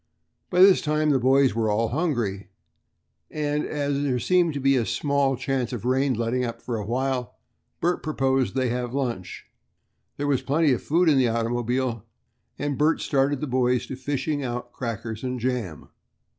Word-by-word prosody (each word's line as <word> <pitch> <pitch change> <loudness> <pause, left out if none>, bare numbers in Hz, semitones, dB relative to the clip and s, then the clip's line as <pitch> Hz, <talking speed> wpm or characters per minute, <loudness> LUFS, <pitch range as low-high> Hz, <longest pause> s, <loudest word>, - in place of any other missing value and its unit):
By 180 0 +3
this 190 0 +7
time 150 0 +1
the 135 - +3
boys 130 0 +4
were 110 -1 0
all 110 +2 +1
hungry, 120 - -2 0.8
and 150 -1 -1
as 145 -1 -1
there 135 -3 0
seemed 170 +4 +2
to - - -2
be 135 0 +3
a 125 - +2
small 135 +3 0
chance 130 -1 -2
of 120 - -5
the 125 - 0
rain 130 0 +2
letting 120 +3 -1
up 115 -1 -4
for 120 - -4
a 105 - -4
while, 125 -1 -2 0.5
Bert 175 +1 +1
proposed 135 -6 0
that - - +1
they 130 - +1
have 125 +1 -3
lunch. 120 -10 -3 0.7
There 145 - -2
was 140 -3 +1
plenty 150 +1 +2
of 125 - 0
food 170 +3 +2
in 145 -4 +5
the 125 - +3
automobile, 120 0 -1 0.5
and 145 0 -3
Bert 155 +2 +3
started 140 -1 +1
the - - -1
boys 125 -2 +1
to - - -6
fishing 140 +2 -2
out 120 -1 -4
crackers 115 -3 -5
and 125 -1 -3
jam. 120 - -3
130 Hz, 185 wpm, -25 LUFS, 120-145 Hz, 0.8 s, this